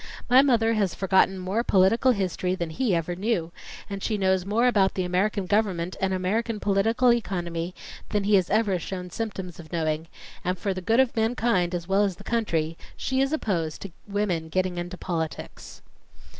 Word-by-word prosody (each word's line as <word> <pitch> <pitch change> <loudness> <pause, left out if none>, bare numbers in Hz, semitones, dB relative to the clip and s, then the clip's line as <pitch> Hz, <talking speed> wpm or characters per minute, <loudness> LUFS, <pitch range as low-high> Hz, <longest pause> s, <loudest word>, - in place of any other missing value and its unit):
My 255 +2 +7
mother 230 -5 +3
has 200 -5 0
forgotten 190 0 +3
more 190 +5 -1
political 225 +6 +4
history 185 -3 -1
than 170 -3 -4
he 210 +2 +1
ever 170 +1 -2
knew, 185 -4 -1 0.4
and 200 -1 -6
she 215 +1 -1
knows 190 -1 +1
more 225 +4 +2
about 200 -6 +3
the 185 - 0
American 185 +2 0
government 185 -3 0
and 190 0 +1
American 210 +5 -1
political 225 +5 +3
economy 175 -5 -3 0.3
than 210 -1 0
he 205 +1 +1
has 185 -3 +4
ever 205 -3 +2
shown 180 +1 -6
symptoms 190 -5 -5
of 160 -2 -12
knowing, 160 -1 -1 0.4
and 180 +1 -1
for 195 +2 -1
the 185 - -5
good 225 +7 +2
of 265 -2 +3
mankind 220 -6 +1
as 170 0 -4
well 195 +1 +3
as 195 -3 0
the - - -13
country 165 -9 -1 0.2
she 265 0 0
is 270 +1 +1
opposed 175 - -2
to 195 - -7 0.2
women 195 -6 -1
getting 185 0 -1
into 175 +1 -5
politics." 165 -4 -5
190 Hz, 185 wpm, -26 LUFS, 175-220 Hz, 0.4 s, My